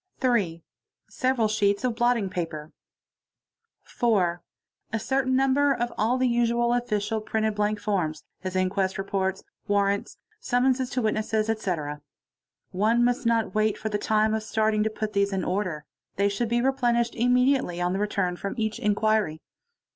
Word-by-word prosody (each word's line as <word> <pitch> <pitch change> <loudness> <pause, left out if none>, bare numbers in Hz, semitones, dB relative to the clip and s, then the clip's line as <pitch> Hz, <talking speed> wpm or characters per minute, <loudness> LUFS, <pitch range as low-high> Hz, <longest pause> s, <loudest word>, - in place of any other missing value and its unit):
3. 200 - +1 0.5
Several 255 -3 +1
sheets 205 0 +1
of 250 -2 +1
blotting 240 -3 +2
paper. 165 -4 -5 1.1
4, 185 -8 0 0.5
A 225 - 0
certain 260 +1 0
number 270 +2 +3
of 240 0 -2
all 230 +4 +1
the 255 0 +2
usual 235 0 +2
official 220 -3 -1
printed 220 0 -1
blank 210 0 0
forms, 185 -7 -2 0.2
as 185 0 -2
quest 190 -1 -1
reports, 195 -1 -2 0.2
warrants, 200 0 0 0.2
summonses 255 -2 +1
to 255 - -2
witnesses, 215 0 0
etc. 155 -9 -3 0.7
One 220 +5 +2
must 245 +1 0
not 230 -1 +1
b 215 0 +2
for 220 - -5
the 210 -1 -1
time 215 +1 +2
of 220 - 0
starting 215 0 +1
to 220 - +1
put 215 0 -4
these 200 0 +1
in 190 -2 -1
order; 180 -5 -2 0.3
they 200 +1 +2
should 215 +3 -2
be 240 +1 +1
Riches 240 -3 +1
immediately 250 -5 +2
on 175 +1 0
the 190 - -1
return 200 -3 0
from 200 +1 -4
each 220 -1 -2
inquiry. 210 -5 +1
215 Hz, 155 wpm, -26 LUFS, 200-240 Hz, 1.1 s, number